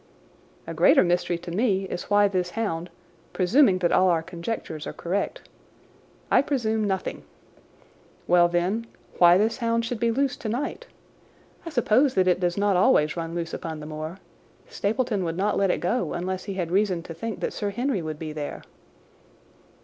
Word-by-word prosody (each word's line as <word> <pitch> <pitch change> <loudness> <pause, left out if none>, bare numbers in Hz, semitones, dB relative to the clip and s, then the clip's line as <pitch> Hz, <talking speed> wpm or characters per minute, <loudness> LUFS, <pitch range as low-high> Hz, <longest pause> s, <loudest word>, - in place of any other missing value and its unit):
"A 165 - -6
greater 165 +2 +5
mystery 175 -1 0
to 170 0 -9
me 195 0 +1
is 180 -2 -5
why 205 0 +4
this 185 -2 -1
hound, 175 -6 -2 0.4
presuming 195 +2 +4
that 175 -2 +1
all 185 0 +4
our 165 -2 +1
conjectures 170 -3 -5
are - - -5
correct—" 190 +4 -3 0.8
"I - - +6
presume 225 -6 -1
nothing." 190 -1 -3 1.0
"Well, 175 -1 +5
then, 180 +7 -1 0.3
why 175 0 +7
this 220 +3 +1
hound 230 -2 0
should 235 -1 -4
be 235 - +2
loose 270 +3 0
tonight. 255 - -4 0.8
I - - -2
suppose 255 -1 +2
that 185 -1 +3
it 180 -1 +3
does 175 0 0
not 200 -1 +2
always 155 -4 +3
run 165 0 -4
loose 170 -1 -4
upon 160 -2 -5
the 150 - -8
moor. 155 +3 -6 0.5
Stapleton 225 - -1
would 165 -1 -3
not 205 +2 +1
let 195 -1 +2
it - - 0
go 180 -1 -1
unless 185 +1 -3
he 200 -2 -5
had 175 -3 -3
reason 190 -3 +1
to 165 - -8
think 220 +7 -5
that - - -2
Sir 205 - -2
Henry 240 0 -1
would 155 -1 -5
be 155 -1 -6
there." 150 -1 -6
185 Hz, 175 wpm, -25 LUFS, 170-220 Hz, 1.0 s, why